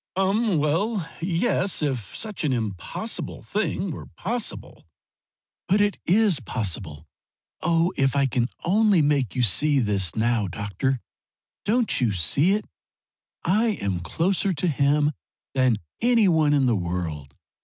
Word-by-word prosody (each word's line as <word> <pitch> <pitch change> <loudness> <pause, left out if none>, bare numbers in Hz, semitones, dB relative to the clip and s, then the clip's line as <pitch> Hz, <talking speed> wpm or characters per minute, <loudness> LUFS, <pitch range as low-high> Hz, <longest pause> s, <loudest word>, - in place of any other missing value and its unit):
"Um 195 +1 +2
well, 165 +6 0
yes, 180 0 0
if 130 -9 -3
such 215 -5 -4
an 150 - +1
impossible 110 - -3
thing 200 -3 -2
were - - -8
possible." 230 +3 -5 0.8
"But 200 +2 +3
it 205 0 +1
is 200 -3 +3
possible! 95 - -4 0.6
Oh 165 +1 +2
if 135 0 +1
I 140 -1 +3
can 125 -2 0 0.2
only 200 -2 +4
make 140 -6 +1
you 125 - +1
see 145 +8 +3
this 100 - 0
now! 115 -2 +1
Doctor, 105 +7 -2 0.6
don't 225 - +1
you 115 -4 +2
see 140 - +2
it? 210 - -1 0.8
I 215 +4 +2
am 95 -3 -1
closer 185 - 0
to 175 +3 -1
him 145 0 +2 0.4
than 130 -4 +3 0.2
any 235 -3 +4
one 155 -4 +3
in 140 -2 +3
the 120 -2 +3
world! 85 -6 -4
150 Hz, 135 wpm, -24 LUFS, -, 0.8 s, only